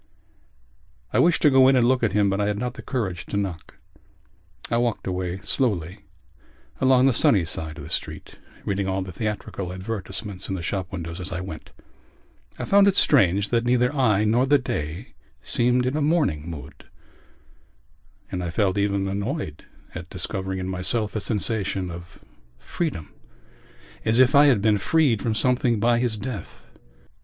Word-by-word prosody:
I - - +3
wished 170 0 +3
to 150 - +6
go 130 -1 +6
in 135 - +5
and 120 -2 +4
look 130 0 +2
at 115 -4 +1
him 105 0 +3
but 100 +1 0
I 100 - +1
had 105 -1 -1
not 125 +2 -3
the - - -9
courage 100 -10 -3
to 100 - -3
knock. 95 -5 -5 0.9
I 115 - +2
walked 120 -2 -1
away 90 -1 -3
slowly 95 - -1 0.8
along 130 -1 +4
the 135 - +4
sunny 100 -5 +4
side 80 -1 -5
of 75 - -8
the - - -9
street, - - -5 0.3
reading 100 -1 -1
all 95 0 -1
the 95 - -8
theatrical 105 -2 -4
advertisements 95 0 -5
in 95 - -1
the 85 - -5
shop 95 +1 -3
windows 85 -1 -6
as 90 - -4
I 90 - -3
went. 80 -4 -8 0.9
I - - -4
found 200 0 +5
it 195 - +3
strange 100 - +3
that 115 -1 +1
neither 125 +2 +2
I 110 -7 +3
nor 120 +5 +2
the 145 +1 +5
day 85 - -5 0.3
seemed 125 +1 +2
in 130 +3 -1
a 155 - 0
mourning 145 - +1
mood 80 -4 -10 1.5
and 90 -1 -3
I 85 - -3
felt 100 +2 0
even 100 -1 0
annoyed 100 - -4 0.3
at 85 +1 -8
discovering 95 0 -4
in 95 0 -4
myself 100 +4 -1
a 105 - -1
sensation 100 -4 -1
of 85 +1 -11 0.3
freedom 80 - -4 0.9
as 110 - +1
if 130 +2 +5
I 145 0 +7
had 115 -8 +3
been 105 -2 +3
freed 140 -3 +2
from 115 -2 -1
something 125 -1 +1
by 120 +2 +3
his 120 -3 0
death. 105 -4 -8
105 Hz, 175 wpm, -24 LUFS, 95-125 Hz, 1.5 s, I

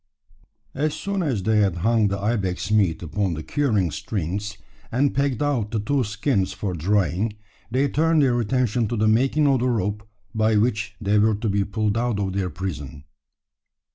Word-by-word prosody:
As 150 +2 -1
soon 200 -1 -2
as 130 - -1
they 110 +2 +2
had 100 -4 +2
hung 115 -2 +3
the 100 0 -1
ibex 100 -2 -1
meat 95 -6 +2
upon 90 +2 -1
the 80 - -6
curing 110 - 0
strings, 100 +2 -4 0.3
and 135 +4 +2
pegged 140 -1 0
out 130 -8 0
the 110 0 -1
two 130 +6 0
skins 105 -2 -1
for 95 0 -3
drying, 95 +4 0 0.4
they 130 +4 +1
turned 160 +2 +2
their 125 -3 +2
attention 120 0 +1
to 120 - -2
the 110 +1 +2
making 135 +7 +3
of 135 -2 +3
the 125 +2 +1
rope 105 -1 -2 0.2
by 110 0 +2
which 105 -1 0
they 105 0 +2
were 110 +1 +3
to 105 +3 -3
be 100 0 +1
pulled 105 +1 -1
out 120 -3 0
of 95 -2 -1
their 95 -2 -1
prison. 75 -6 -6
105 Hz, 180 wpm, -23 LUFS, 100-120 Hz, 0.4 s, hung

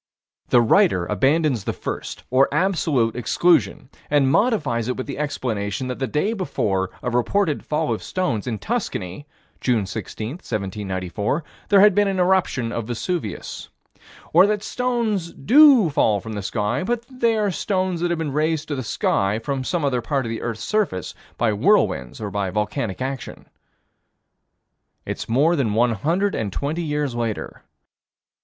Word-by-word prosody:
The 120 - +5
writer 95 -5 +3
abandons 135 - +1
the - - -1
first, - - -6
or 130 +2 +4
absolute, 150 - +1
exclusion, 125 - +1 0.2
and 140 -2 +3
modifies 145 - +1
it 125 - -2
with 130 - -4
the 140 - -6
explanation 125 -5 -2
that 125 - -4
the 135 - -1
day 175 - 0
before 105 - -1
a 125 - -1
reported 150 +7 +1
fall 155 0 -1
of - - -4
stones 135 - -2
in 115 -3 -2
Tuscany, 145 - -4 0.3
June 115 -6 +1
16, 110 +2 -5
1794, 100 - -3 0.3
there 200 -1 +6
had 210 0 +7
been 205 +1 +3
an 195 -1 -1
eruption 180 -10 +1
of 115 -2 -4
Vesuvius 120 - -4 0.6
Or 195 - +7
that 210 0 -1
stones 230 -8 -1
do 265 - +6
fall 105 -7 +2
from 110 +2 -7
the 105 - -4
sky, 105 - -1
but 235 +3 -2
that 255 +1 -16
they 230 -2 +3
are 210 -2 +1
stones 185 -1 -1
that 175 - +1
have 175 - 0
been 155 -4 -3
raised 155 +1 0
to 145 - -1
the 130 - -3
sky 105 -3 0
from 130 +3 -3
some 165 +2 -1
other 125 -3 0
part 135 +1 -1
of 115 - -3
the 115 - -4
earth's 115 -2 -4
surface 205 - -1 0.2
by 115 -2 +2
whirlwinds 65 -10 +2
or 105 -2 -4
by 100 -1 -1
volcanic 105 +2 -2
action. 135 -2 -6 1.6
It's - - -5
more 145 +9 +3
than 115 -9 0
one 120 +1 +3
hundred 170 - 0
and 105 -3 -2
twenty 150 - -2
years 150 -4 -1
later. 115 -3 -4
135 Hz, 165 wpm, -22 LUFS, 110-180 Hz, 1.6 s, had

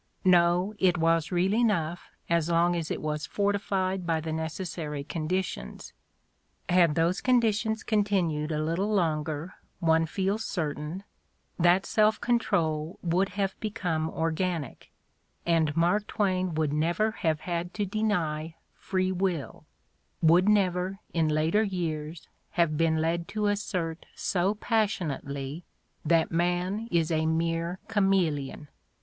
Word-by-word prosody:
No, 180 +2 +4
it 180 -2 +3
was 165 0 +2
real 180 +2 +2
enough 175 -8 0 0.2
as 170 -1 +1
long 170 +1 +3
as 165 -2 -3
it - - -3
was 150 -1 -2
forti 205 0 0
fied 190 -1 -1
by 165 -1 +1
the 160 0 -4
necessary 160 -2 -4
conditions: 175 +5 -4 0.8
had 175 -4 +4
those 170 +3 +1
conditions 225 -3 +2
continued 185 -8 0
a 155 0 -1
little 175 +7 -1
longer, 160 -3 -1 0.3
one 160 -2 +3
feels 195 +5 -1
certain, 155 +1 -3 0.6
that 175 +2 +4
self 215 0 +3
con 240 0 +2
trol 160 -5 -1
would 180 +3 +1
have 195 -1 0
become 175 -7 -2
organic 165 -2 -2 0.5
and 165 -3 +2
Mark 180 +5 +2
Twain 185 -4 0
would 155 -2 0
never 170 +8 +1
have 160 -7 -1
had 175 0 -3
to 205 - 0
deny 170 -7 -1 0.2
"free 185 -1 -1
will," 180 -5 -2 0.5
would 175 +5 +5
never, 190 -2 +2 0.2
in 165 -2 +2
later 155 +7 +2
years, 165 -5 -3 0.3
have 170 -3 +2
been 160 0 +2
led 170 +1 -1
to 215 0 -2
assert 185 -5 -2
so 190 +3 0
passionately 165 - -2 0.4
that 165 +1 +2
man 180 +6 0
is 165 -4 +1
a 160 0 +1
mere 165 +2 0
chameleon. 180 -9 0
175 Hz, 130 wpm, -28 LUFS, 160-195 Hz, 0.8 s, would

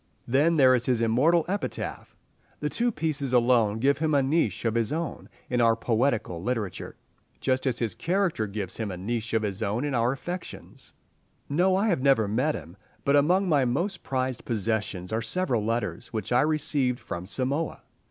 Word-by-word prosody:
Then 145 +7 +3
there 130 -3 +6
is 125 -1 0
his 125 -3 +2
immortal 130 +9 +3
epitaph. 200 +2 -4 0.4
The 150 - -1
two 240 +8 0
pieces 150 - -2
alone 120 -3 +3
give 140 +4 +2
him 155 -1 +1
a 140 - +4
niche 135 - 0
of 115 - +2
his 115 -2 0
own 165 +1 -4 0.2
in 125 -1 +1
our 115 -1 +4
poetical 115 -6 0
literature, 110 -3 -3 0.4
just 130 +1 0
as 125 -2 0
his 115 -5 -1
character 175 - 0
gives 100 -2 -4
him 110 -2 -3
a 90 - -5
niche 115 +4 -3
of 110 - +1
his 100 0 -2
own 110 +6 -1
in 145 - -2
our 120 0 +2
affections. 175 +6 -7 0.5
No, 180 +6 +3
I 200 +1 +2
never 135 -7 +3
met 130 +9 +1
him. 85 +4 -9 0.3
But 140 - +4
among 180 +7 +3
my 145 -5 +3
most 145 +11 -1
prized 130 -2 -2
possessions 105 -4 -2
are 110 - 0
several 125 - 0
letters 110 -2 -2
which 110 -2 -5
I 125 - +5
received 145 -4 0
from 85 +1 -6
Samoa. 135 +8 -2
125 Hz, 180 wpm, -27 LUFS, 110-150 Hz, 0.5 s, there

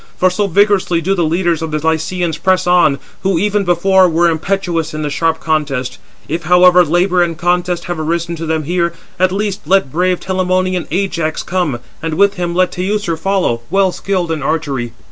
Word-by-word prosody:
For 185 0 +3
so 205 +2 0
vigorously 200 -2 +2
do 185 +4 0
the 175 -3 0
leaders 170 0 0
of 160 - -3
the 155 - -1
Lycians 160 +1 -1
press 185 -1 +1
on, 175 -5 +3 0.2
who 190 -2 +1
even 205 +3 +1
before 185 +1 +3
were 170 +1 +2
impetuous 170 -1 -2
in 155 - -3
the 145 - -2
sharp 160 +2 0
contest. 140 -6 -2 0.3
If, 165 +3 -4
however, 180 0 +6
labour 175 +3 +2
and 170 -2 0
contest 175 +1 0
have 175 -2 -4
arisen 170 +2 -2
to 165 0 -5
them 160 -1 -1
there, 170 -1 0 0.3
at 185 0 +3
least 200 -4 -3
let 190 -7 +2
brave 180 +3 +1
Telamonian 185 -1 -1
Ajax 170 -4 -2
come, 175 -8 -1 0.2
and 160 -1 -3
with 200 +3 +3
him 175 -3 -3
let 185 0 +2
Teucer 185 -1 -2
follow, 185 -10 -1
well 195 +1 +2
skilled 180 -3 -2
in 160 -2 -2
archery." 135 -6 -2
175 Hz, 185 wpm, -15 LUFS, 160-185 Hz, 0.3 s, however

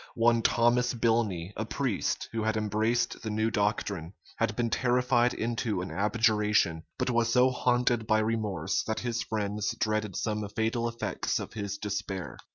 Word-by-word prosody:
One 115 0 +4
Thomas 120 +2 +3
Bilney, 110 -6 0
a 110 - -2
priest, 115 -1 -1
who 115 - -2
had 110 0 0
embraced 110 +3 0
the 110 - -4
new 110 +1 0
doctrine, 100 -5 -1 0.2
had 115 -1 0
been 115 -1 0
terrified 125 -1 +2
into 115 -3 -2
an 90 - -6
abjuration; 105 -4 +2 0.2
but - - 0
was 115 -1 +2
so 125 +1 +5
haunted 125 -2 +1
by 110 - +4
remorse, 110 -6 0
that 110 - -1
his 120 -1 -2
friends 105 -1 -2
dreaded 110 -3 0
some 105 -2 -2
fatal 115 +1 0
effects 115 0 -2
of - - -6
his 100 -2 -4
despair. 100 -2 -4
110 Hz, 160 wpm, -29 LUFS, 105-120 Hz, 0.2 s, so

